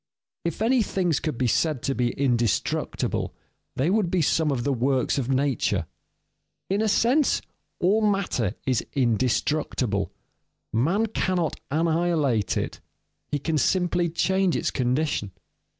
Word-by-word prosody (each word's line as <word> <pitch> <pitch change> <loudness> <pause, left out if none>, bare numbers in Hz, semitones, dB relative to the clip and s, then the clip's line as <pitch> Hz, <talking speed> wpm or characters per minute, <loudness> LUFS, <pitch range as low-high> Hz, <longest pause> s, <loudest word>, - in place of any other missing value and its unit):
_ - - -64 0.4
If 170 +5 -2
any 245 +2 +3
things 180 -7 0
could 155 -6 -3
be 130 - 0
said 140 +3 +1
to 135 - 0
be 120 -2 +1
indestructible, 120 -6 0 0.4
they 145 +7 +1
would 205 -4 +2
be 175 -2 +1
some 160 +1 +2
of 125 -3 -1
the 140 - +1
works 130 +2 +1
of 130 -1 -3
nature. 130 -9 +1 0.9
In 200 +2 +2
a 220 - +2
sense, 245 +8 +3 0.4
all 200 +5 +3
matter 195 - 0
is 130 -2 +1
indestructible. 125 -3 0 0.6
Man 165 - +2
cannot 185 -6 -1
annihilate 160 -7 +1
it, - - -3 0.5
he 145 - -1
can 155 +2 -1
simply 175 +2 +1
change 190 +2 +1
its - - 0
condition. 125 -5 -1
155 Hz, 135 wpm, -25 LUFS, 125-180 Hz, 0.9 s, any